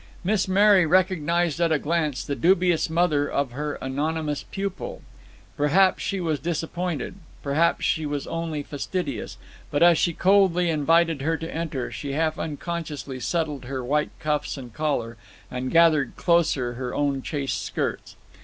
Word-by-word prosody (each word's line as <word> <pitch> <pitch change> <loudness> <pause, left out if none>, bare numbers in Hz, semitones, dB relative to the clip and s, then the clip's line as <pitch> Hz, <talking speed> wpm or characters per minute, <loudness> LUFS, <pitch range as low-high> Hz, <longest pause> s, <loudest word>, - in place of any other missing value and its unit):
Miss 195 +1 +1
Mary 195 0 +5
recognized 175 -2 +2
at 170 -1 +3
a 155 - +4
glance 150 -3 -1
the 140 - -2
dubious 175 -1 +3
mother 160 -4 +2
of 140 -3 -1
her 145 +3 -3
anonymous 150 +2 -2
pupil. 195 -1 -5 0.5
Perhaps 180 +6 +3
she 195 - -2
was 160 -5 -1
disappointed, 170 +2 -3 0.3
perhaps 155 +4 +1
she 155 -1 0
was 145 -1 -3
only 165 -3 -3
fastidious; 165 +6 -4 0.3
but 145 +2 +2
as 170 -2 +6
she 170 - +2
coldly 180 -2 +3
invited 165 0 +2
her 160 +3 0
to 165 +1 -6
enter, 160 -6 -3
she 140 -2 -5
half 155 +1 0
unconsciously 150 -3 -5
settled 150 -2 -2
her 130 0 -4
white 150 +4 +1
cuffs 150 -1 -1
and 125 -4 -9
collar, 130 -7 -2 0.3
and 125 +1 -3
gathered 160 -5 +4
closer 155 -8 +2
her 125 0 -5
own 140 -2 0
chaste 140 -1 -3
skirts. - - -3
155 Hz, 150 wpm, -25 LUFS, 145-170 Hz, 0.5 s, as